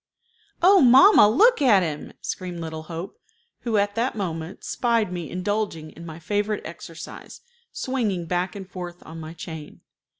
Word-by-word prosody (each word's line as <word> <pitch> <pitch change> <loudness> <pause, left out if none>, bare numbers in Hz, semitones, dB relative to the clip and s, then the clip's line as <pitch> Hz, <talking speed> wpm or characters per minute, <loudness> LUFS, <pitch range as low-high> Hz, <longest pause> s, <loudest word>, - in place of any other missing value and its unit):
"Oh, 385 +1 +7
mamma, 260 - +8
look 435 - +4
at 210 -9 +5
him!" 150 -3 -5
screamed 180 -2 -5
little 160 -1 -5
Hope, 170 +3 -7 0.4
who 230 -3 -1
at 205 0 +1
that 235 +3 -1
moment 165 -2 -5
spied 230 -6 0
me 175 -4 -5
indulging 185 -4 -3
in 170 +1 -11
my 160 -1 -8
favorite 205 +5 -2
exercise, 165 0 -10 0.3
swinging 220 -10 -2
back 180 +2 -2
and 195 -2 -7
forth 175 -2 -8
on 160 +1 -9
my 160 0 -8
chain. 160 -2 -9
185 Hz, 155 wpm, -24 LUFS, 165-220 Hz, 0.4 s, mamma